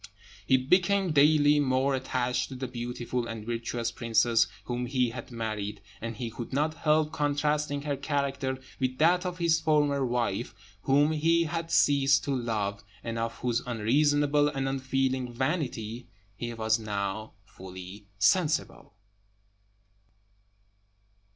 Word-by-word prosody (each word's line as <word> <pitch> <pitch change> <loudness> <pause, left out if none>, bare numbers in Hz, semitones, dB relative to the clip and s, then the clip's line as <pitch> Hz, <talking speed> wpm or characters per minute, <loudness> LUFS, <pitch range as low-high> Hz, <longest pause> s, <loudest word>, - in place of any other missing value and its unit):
He 130 - +5
became 180 +7 +2
daily 150 0 +5
more 135 0 +2
attached 125 -2 -1
to 135 - -7
the 130 0 -4
beautiful 120 0 -4
and 115 -2 -6
virtuous 115 0 -2
princess 115 0 +2 0.2
whom 125 0 -3
he 125 -2 +1
had 120 0 -8
married; 110 -3 -4 0.2
and 115 0 -4
he 115 -2 -4
could 115 +1 -7
not 150 +3 +1
help 155 -1 +1
contrasting 145 0 0
her 145 -1 -1
character 140 -2 -2 0.2
with 130 -1 -1
that 180 +4 +3
of 180 0 -5
his 165 -2 +2
former 145 -3 +2
wife, 120 -1 -1 0.3
whom 145 +3 +3
he 165 +2 +2
had 165 0 -3
ceased 140 -3 +4
to 140 -1 -1
love, 105 -5 -2 0.2
and 115 0 -3
of 115 0 -2
whose 120 -1 0
unreasonable 145 +5 +2
and 135 -2 -2
unfeeling 130 -1 -1
vanity 125 -4 -3 0.3
he 120 +3 -5
was 110 0 +1
now 105 0 -4
fully 95 +1 -11
sensible. 155 - +1
130 Hz, 130 wpm, -28 LUFS, 115-145 Hz, 0.3 s, He